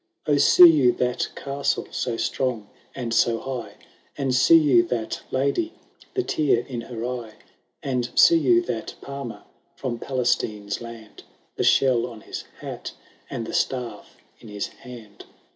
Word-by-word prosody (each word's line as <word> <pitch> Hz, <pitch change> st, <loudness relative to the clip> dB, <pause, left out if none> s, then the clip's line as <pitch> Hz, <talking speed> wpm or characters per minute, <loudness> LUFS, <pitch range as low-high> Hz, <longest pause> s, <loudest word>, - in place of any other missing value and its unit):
O 145 Hz, -1 st, +3 dB
see 175 Hz, +4 st, +8 dB
you 145 Hz, -7 st, +5 dB
that 125 Hz, 0 st, -1 dB
castle, 140 Hz, 0 st, -2 dB
so 120 Hz, -2 st, -2 dB
strong 120 Hz, -6 st, -2 dB, 0.3 s
and 120 Hz, -3 st, -3 dB
so 115 Hz, 0 st, +3 dB
high? 130 Hz, -1 st, -6 dB, 0.4 s
And 135 Hz, -2 st, 0 dB
see 130 Hz, +6 st, +6 dB
you 140 Hz, -7 st, +5 dB
that 115 Hz, -2 st, -3 dB
lady, 140 Hz, -, 0 dB, 0.4 s
the 380 Hz, -, +1 dB
tear 145 Hz, -, +1 dB
in 125 Hz, -4 st, -5 dB
her 115 Hz, -1 st, -6 dB
eye? 120 Hz, -3 st, -5 dB, 0.5 s
And 125 Hz, -3 st, -1 dB
see 335 Hz, -1 st, +7 dB
you 355 Hz, +1 st, +4 dB
that -, -, -5 dB
palmer, 140 Hz, -4 st, -7 dB, 0.3 s
from 120 Hz, -3 st, -4 dB
Palestine's 115 Hz, -6 st, -1 dB
land, 115 Hz, -2 st, -11 dB, 0.3 s
The -, -, -1 dB
shell 125 Hz, -3 st, +3 dB
on 115 Hz, -3 st, -11 dB
his -, -, -7 dB, 0.2 s
hat, -, -, -7 dB, 0.4 s
and 115 Hz, -, -4 dB
the -, -, -7 dB
staff 125 Hz, -3 st, -3 dB, 0.2 s
in -, -, -14 dB
his 105 Hz, -1 st, -4 dB
hand 115 Hz, -5 st, -13 dB
125 Hz, 150 wpm, -24 LUFS, 115-140 Hz, 0.5 s, see